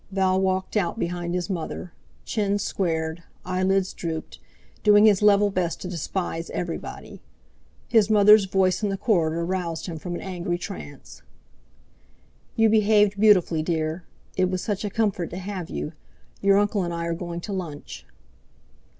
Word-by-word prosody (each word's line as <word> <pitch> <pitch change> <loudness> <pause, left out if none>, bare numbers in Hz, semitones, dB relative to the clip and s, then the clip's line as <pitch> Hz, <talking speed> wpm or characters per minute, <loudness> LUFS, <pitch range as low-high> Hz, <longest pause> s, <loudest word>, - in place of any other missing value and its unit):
Val 190 -1 +2
walked 190 +1 -1
out 200 0 0
behind 175 -2 -2
his 180 -1 -2
mother, 180 -1 -5 0.3
chin 205 -2 0
squared, 165 -4 -2 0.2
eyelids 185 +1 +1
drooped, 160 -2 -5 0.4
doing 210 0 +6
his 210 -3 +5
level 205 0 +5
best 170 -3 -1
to - - -6
despise 170 -1 -3
everybody. 175 -2 -6 0.7
His 220 -3 +4
mother's 210 -1 +7
voice 190 0 +1
in 210 - 0
the 195 - -2
corridor 170 -6 +1
roused 175 -3 -3
him 165 -3 -6
from 175 +2 -5
an - - -5
angry 175 -2 -3
trance. 75 - -9 1.3
"You 225 0 +4
behaved 210 -1 +3
beautifully, 185 -7 +4
dear. 160 +1 -2 0.3
It 185 -1 +2
was 185 -1 -2
such 205 -2 -2
a 205 - -2
comfort 200 -5 -1
to 175 - -7
have 190 -2 -5
you. 75 +1 -4 0.5
Your 195 0 +4
uncle 205 0 +1
and 175 -1 -2
I 170 0 -3
are 170 - -1
going 170 0 -5
to 200 - -5
lunch." 165 -6 -6
185 Hz, 155 wpm, -24 LUFS, 170-200 Hz, 1.3 s, mother's